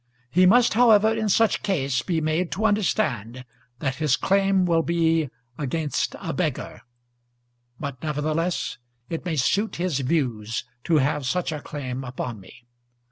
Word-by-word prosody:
He 180 +4 +5
must, 240 +4 +5
however, 220 -2 +5
in 220 -1 -1
such 225 +3 +3
case 140 - 0
be 165 +4 -1
made 160 +3 0
to 215 - -1
understand 130 - 0 0.3
that 135 -1 -2
his 150 -4 +2
claim 195 -1 +2
will 165 -2 +3
be 165 -2 +1 0.3
against 150 +1 -1
a - - -4
beggar; - - -3 1.0
but, 140 -3 -5
nevertheless, 155 +1 -1 0.3
it 165 +1 -4
may 170 -3 -1
suit 200 - +1
his 170 -5 -1
views 125 -6 -1 0.2
to 165 -2 +3
have 145 -1 +1
such 180 +3 0
a 150 -2 -4
claim 130 -3 -5
upon 125 -3 -5
me. 110 +6 -16
160 Hz, 145 wpm, -24 LUFS, 135-185 Hz, 1.0 s, He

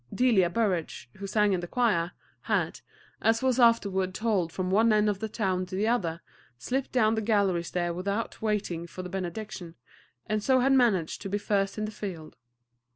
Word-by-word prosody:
Delia 225 -8 +3
Burrage, 180 - -2
who 200 0 -6
sang 210 0 +2
in 185 - +1
the 175 - -5
choir, 180 -7 +1 0.4
had, - - 0 0.4
as 225 +2 +2
was 260 -1 +2
afterward 200 -6 +3
told 205 -7 0
from 185 +1 -3
one 220 +3 +4
end 210 0 +3
of 205 -2 0
the 220 +1 -3
town 185 -4 -1
to 185 - -6
the 205 +3 0
other, 180 -8 0 0.4
slipped 260 - -2
down 220 -4 +3
the 220 - 0
gallery 200 -5 +2
stair 175 0 -2
without 200 +5 -3
waiting 205 -6 -2
for 185 +2 -8
the 180 - -6
benediction, 180 -1 -5 0.5
and 215 0 -1
so 260 +1 +4
had 270 +2 +3
managed 220 -11 +2
to 195 - -5
be 205 - 0
first 200 -1 -1
in 215 - -1
the 215 - -5
field. 180 -7 -7
200 Hz, 190 wpm, -28 LUFS, 180-220 Hz, 0.5 s, one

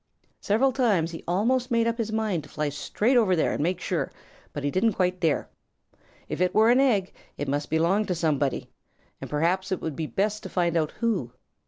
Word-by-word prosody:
Several 235 +7 +2
times 210 -11 +1
he 165 - -8
almost 240 +8 +1
made 230 -1 +2
up 230 +1 -1
his 225 -1 -1
mind 215 -6 0
to 145 - -15
fly 150 0 -2
straight 150 - 0
over 215 -7 +4
there 160 - +1
and - - -2
make 175 +4 0
sure, - - -2 0.4
but 145 - -6
he 145 - 0
didn't 200 +6 +2
quite 180 -1 0
dare. 165 -4 +1 0.8
If - - -4
it 180 +1 +1
were 220 +2 +6
an 250 - +4
egg, 215 -9 +2 0.2
it 145 - -3
must 145 +2 -2
belong 170 +7 +2
to 180 - 0
somebody, 150 -5 -1 0.5
and - - -6
perhaps 180 +6 0
it 190 - 0
would 160 -3 -4
be 160 +1 -3
best 210 +3 -1
to - - -8
find 170 -2 0
out 155 -2 +1
who. 190 - 0
185 Hz, 210 wpm, -26 LUFS, 160-220 Hz, 0.8 s, were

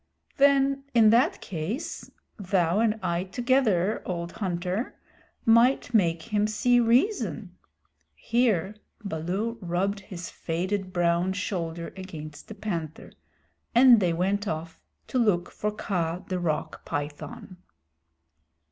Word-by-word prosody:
"Then 275 0 +3
in 220 -2 +7
that 235 +3 +3
case, 190 - -5 0.3
thou 185 -2 +1
and 220 -1 +1
I 170 0 0
together, 220 -4 +1
old 170 -1 -4
hunter, 185 +2 -3 0.5
might 240 +2 +4
make 170 -6 +2
him 210 0 +3
see 245 +3 +3
reason." 250 - +1 0.6
Here 215 -5 +1 0.3
Baloo 195 +6 -3
rubbed 190 +3 -1
his 185 -3 -8
faded 185 +3 -3
brown 175 +1 +1
shoulder 170 -4 -4
against 160 -6 -9
the 220 - -9
Panther, 170 -7 -5 0.6
and 245 -1 +8
they 180 -4 +2
went 195 +5 0
off 160 0 -5 0.2
to 255 - -1
look 195 -7 +2
for 210 - -2
Kaa 180 -4 -2
the 185 -1 -2
Rock 155 -4 -2
Python. 145 +5 -6
190 Hz, 115 wpm, -27 LUFS, 170-225 Hz, 0.6 s, and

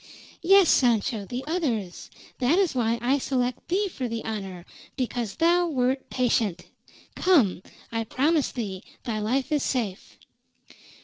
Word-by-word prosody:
"Yes, 385 +1 +6
Sancho, 230 -3 +2
the 245 +5 -4
others. 255 - -2 0.3
That 265 +7 +3
is 385 -4 +2
why 235 -2 +1
I 270 +4 +2
select 250 -2 -2
thee 395 +4 +1
for 265 -9 -4
the 230 -1 -5
honor, 195 -5 -5 0.3
because 240 -4 -2
thou 345 +2 +3
wert 265 -3 -1
patient. 225 -7 0 0.5
Come. 265 - +3 0.3
I 225 -1 -2
promise 290 +6 +1
thee 200 -6 -5 0.2
thy 225 -4 -2
life 255 +7 -1
is 295 -2 +2
safe." 220 -8 -3
250 Hz, 135 wpm, -26 LUFS, 220-300 Hz, 0.5 s, Yes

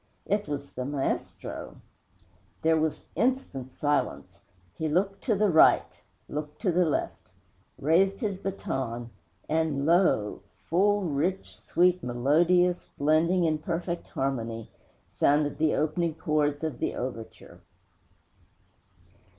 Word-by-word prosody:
It 205 +1 0
was 145 -1 -5
the 125 - -4
maestro! 135 - -4 0.9
There 160 0 +4
was 155 -1 -1
instant 235 - -1
silence. 145 -2 -1 0.4
He 160 -1 -2
looked 195 +5 0
to 225 - +2
the 205 -1 +2
right; 160 - +4 0.3
looked 150 0 -6
to 190 - +3
the 180 +1 +3
left; 155 - -2 0.5
raised 190 +7 +2
his 205 -4 -1
baton; 135 - -4 0.4
and 155 -3 0
lo! 165 - +2 0.3
full, 205 +4 +3
rich, 170 +4 -1
sweet, 180 +1 +2
melodious, 170 +9 +2
blending 160 +5 +3
in 155 -2 +1
perfect 170 +2 -3
harmony, 115 -4 -3 0.4
sounded 145 0 +1
the 155 -1 +2
opening 160 +1 0
chords 150 -2 0
of 150 -6 -3
the - - -1
overture!' 120 -3 -7
160 Hz, 115 wpm, -28 LUFS, 140-180 Hz, 0.9 s, There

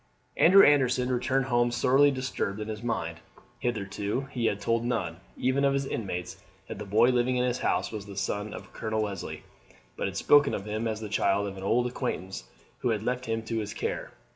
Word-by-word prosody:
Andrew 195 +4 +7
Anderson 130 -3 +3
returned 130 +2 +1
home 120 -1 +2
sorely 135 +4 +4
disturbed 130 -6 -2
in 105 0 -5
his 105 0 -5
mind. 85 -8 -3 0.4
Hitherto 105 -1 -2
he 120 -4 0
had 100 - -1
told 115 +3 0
none, 110 -9 -2 0.2
even 130 +2 +1
of 140 0 +3
his 140 0 0
intimates, 90 -8 -4 0.3
that - - -7
the 105 - -5
boy 110 +5 +4
living 125 +1 +1
in 125 - +2
his 125 0 -1
house - - 0
was 105 -2 -6
the 100 -1 -9
son 100 +2 -2
of - - -9
Colonel 110 0 -2
Leslie, 100 -3 -5 0.5
but - - -2
had - - -5
spoken 145 -1 +5
of 100 - -5
him 110 +2 -2
as 110 -1 -3
the 110 - -4
child 100 -1 +1
of 95 - -6
an 95 - -8
old 115 +5 +2
acquaintance 95 - -4 0.3
who 125 - 0
had 110 -2 0
left 125 +1 -2
him 115 0 -1
to 115 0 -2
his 105 +1 -5
care. - - -3
115 Hz, 210 wpm, -28 LUFS, 105-125 Hz, 0.5 s, Andrew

